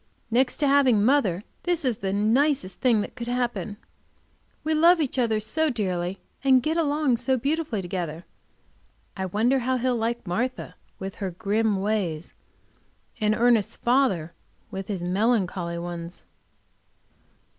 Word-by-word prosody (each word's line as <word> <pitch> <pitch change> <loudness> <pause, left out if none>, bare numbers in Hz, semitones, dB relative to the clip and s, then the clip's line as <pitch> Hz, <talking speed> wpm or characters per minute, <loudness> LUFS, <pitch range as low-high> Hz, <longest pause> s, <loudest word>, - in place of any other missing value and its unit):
Next 250 +2 +2
to 290 - +1
having 260 -7 +4
mother, 215 -9 +2 0.2
this 350 -4 0
is 245 -4 0
the 195 -1 -2
nicest 215 0 +1
thing 235 -5 +3
that - - -6
could 240 -2 -6
happen. 240 -4 -2 0.9
We 315 - 0
love 335 +3 +5
each 275 -3 -1
other 225 -3 +2
so 305 +9 0
dearly, 185 -6 -2 0.2
and 260 -2 +5
get 315 +3 0
along 295 -5 +1
so 260 +2 +1
beautifully 275 - -1
together 175 -2 -4 0.9
I 190 -1 -3
wonder 230 +8 +2
how 255 +1 0
he'll 250 0 0
like 230 0 -2
Martha 235 +9 -2 0.2
with 195 0 -6
her 195 - -1
grim 205 +2 0
ways, 190 -6 -2 0.9
and 215 0 +2
Ernest's 230 -3 +3
father 235 - +1 0.4
with 195 0 -5
his 190 -4 -3
melancholy 185 -3 0
ones. 170 0 -6
225 Hz, 140 wpm, -25 LUFS, 190-260 Hz, 0.9 s, love